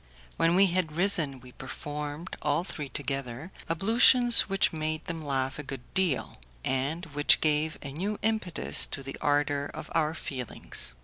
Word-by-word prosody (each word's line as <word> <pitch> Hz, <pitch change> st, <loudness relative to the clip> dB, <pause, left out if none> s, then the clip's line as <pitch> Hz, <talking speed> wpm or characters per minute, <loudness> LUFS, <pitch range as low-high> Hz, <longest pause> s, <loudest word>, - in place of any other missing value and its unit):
When 165 Hz, +1 st, +2 dB
we 195 Hz, +2 st, +6 dB
had 175 Hz, -4 st, 0 dB
risen 160 Hz, -7 st, 0 dB
we 125 Hz, 0 st, -13 dB
performed, 145 Hz, +5 st, -6 dB
all 150 Hz, +3 st, +1 dB
three 150 Hz, -6 st, -6 dB
together, 135 Hz, +3 st, -4 dB, 0.2 s
ablutions 230 Hz, +7 st, +5 dB
which 195 Hz, -3 st, +2 dB
made 155 Hz, 0 st, -3 dB
them 165 Hz, -1 st, -5 dB
laugh 135 Hz, -1 st, -2 dB
a -, -, -4 dB
good 135 Hz, -3 st, -7 dB
deal, 170 Hz, -12 st, 0 dB, 0.3 s
and 140 Hz, +7 st, -1 dB
which 145 Hz, 0 st, +5 dB
gave 155 Hz, 0 st, +1 dB
a 140 Hz, -, -6 dB
new 195 Hz, +8 st, -3 dB
impetus 215 Hz, -6 st, +3 dB
to 135 Hz, -, -5 dB
the 135 Hz, 0 st, -7 dB
ardour 145 Hz, 0 st, +1 dB
of -, -, -9 dB
our 160 Hz, -1 st, +1 dB
feelings. 125 Hz, -, -5 dB
150 Hz, 160 wpm, -28 LUFS, 140-175 Hz, 0.3 s, we